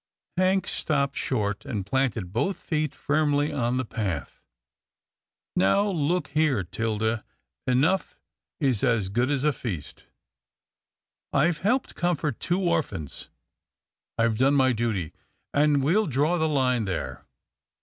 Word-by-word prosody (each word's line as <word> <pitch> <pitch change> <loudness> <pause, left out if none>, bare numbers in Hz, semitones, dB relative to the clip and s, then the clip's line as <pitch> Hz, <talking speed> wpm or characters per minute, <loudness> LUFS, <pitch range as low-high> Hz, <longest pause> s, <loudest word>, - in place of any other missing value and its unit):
Hank 185 +1 +2
stopped 140 -2 0
short, 105 -6 -1
and 105 -6 -4
planted 115 -6 -1
both 195 -2 0
feet 155 -4 -2
firmly 145 0 +1
on 125 -2 0
the 130 - -1
path. 95 -10 -4 0.6
" - - -65 0.2
Now 100 - +3
look 165 -1 0
here, 145 -8 +2
'Tilda, 110 +3 -1 0.4
enough 145 +10 +2 0.4
is 130 -8 +2
as 115 -7 +2
good 120 +6 +1
as 140 -2 0
a 150 -1 +3
feast. 95 - -5 1.2
I've 160 +3 +2
helped 245 +8 +1
comfort 160 -7 -1
two 180 +3 0
orphans. 160 - -1 0.9
I've 115 -1 +1
done 135 +2 +4
my 130 -2 +4
duty, 105 -8 -2 0.4
and 145 -1 +3
we'll 185 +9 +3
draw 150 +5 +1
the 160 0 +2
line 125 -5 +2
there." 65 -9 -4
135 Hz, 130 wpm, -26 LUFS, 110-155 Hz, 1.2 s, done